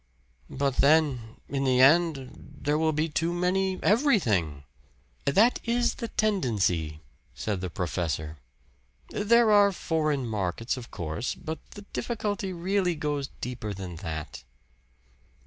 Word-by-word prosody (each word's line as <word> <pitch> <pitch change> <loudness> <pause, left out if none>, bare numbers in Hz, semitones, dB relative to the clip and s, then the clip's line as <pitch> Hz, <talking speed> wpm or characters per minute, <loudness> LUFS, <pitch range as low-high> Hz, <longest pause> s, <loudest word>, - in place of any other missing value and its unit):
"But 140 -1 -1
then 140 -7 +3
in 140 -1 -2
the 130 -2 +3
end 140 -1 +4 0.3
there 150 +1 +1
will 160 0 +2
be 155 +1 0
too 165 +2 -1
many 185 +2 0
everything." 120 - +2 0.6
"That 210 - +4
is 240 0 +1
the 230 - -5
tendency," 100 - 0 0.3
said 90 - -3
the 95 - -3
professor. 80 -3 -3 0.7
"There 230 +2 +3
are 205 -1 +6
foreign 155 -6 -1
markets, 110 +1 -2
of 125 -2 -9
course. 85 +7 -4
But 160 -1 -6 0.2
the 205 - -9
difficulty 205 -5 -2
really 180 0 0
goes 145 -2 -2
deeper 115 -5 -4
than 90 -3 -7
that." 80 -4 -6
145 Hz, 125 wpm, -27 LUFS, -, 0.7 s, are